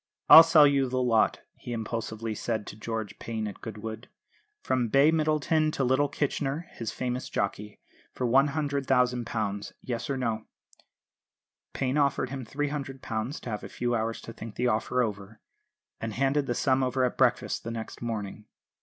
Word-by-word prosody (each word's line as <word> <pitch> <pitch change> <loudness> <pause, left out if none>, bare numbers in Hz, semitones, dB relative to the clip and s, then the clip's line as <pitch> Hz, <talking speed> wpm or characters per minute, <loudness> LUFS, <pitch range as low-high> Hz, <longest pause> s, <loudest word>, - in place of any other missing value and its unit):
"I'll 160 - +13
sell 165 -2 +6
you 140 -2 +3
the 130 +1 -1
lot," 120 -3 +2
he 120 - -7
impulsively 115 0 -4
said 110 0 -3
to - - -8
George 110 -2 -5
Payne 110 -2 -3
at 100 - -9
Goodwood, 110 +1 -7 0.5
"from 125 -2 +1
Bay 140 +6 +5
Middleton 155 0 +2
to 135 - 0
little 130 +3 +3
Kitchener 145 +2 -2
(his 115 -1 -5
famous 125 +1 -3
jockey), 105 +1 -3 0.3
for 125 - -3
£100,000. 125 -6 +1
Yes 120 0 -4
or 135 - -1
no?" 115 -4 -2 1.3
Payne 135 +2 0
offered 140 -2 +1
him 135 -1 -4
£300 135 -3 -3
to - - -7
have 105 - -4
a - - -7
few 120 0 -2
hours 115 0 -1
to 115 - -9
think 110 -1 -9
the 125 - -1
offer 125 +2 +1
over, 105 -1 -5 0.6
and 110 -1 -4
handed 135 +2 +1
the 120 - -1
sum 130 +1 +2
over 130 0 +1
at 125 - -2
breakfast - - +1
the 115 - -5
next 115 -1 -6
morning. 105 -2 -4
125 Hz, 165 wpm, -28 LUFS, 110-135 Hz, 1.3 s, I'll